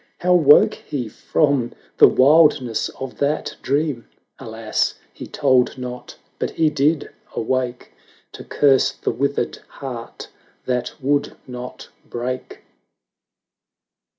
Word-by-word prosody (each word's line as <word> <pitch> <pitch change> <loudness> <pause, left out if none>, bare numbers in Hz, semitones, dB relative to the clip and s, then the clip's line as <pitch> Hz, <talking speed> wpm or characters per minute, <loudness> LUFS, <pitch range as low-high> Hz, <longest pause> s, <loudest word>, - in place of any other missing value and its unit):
How 180 0 +2
woke 150 -5 +6
he 130 -6 -5
from 135 +2 0 0.3
the - - +10
wildness 140 -4 +4
of 135 -1 -7
that 145 +2 -1
dream! 140 -3 -1 0.3
Alas! 110 -3 -2 0.2
he - - -9
told 130 0 +2
not 125 -1 -7
— - - -41
but - - -1
he 160 -2 +1
did 150 +1 +1 0.2
awake 125 +1 -2 0.4
To - - -10
curse 135 -2 +3
the - - -2
withered 140 +4 -1
heart 125 -4 -8 0.4
that 125 -1 -2
would 145 +1 0
not 125 0 -8 0.2
break. 125 +2 -5
130 Hz, 115 wpm, -21 LUFS, 125-145 Hz, 0.4 s, the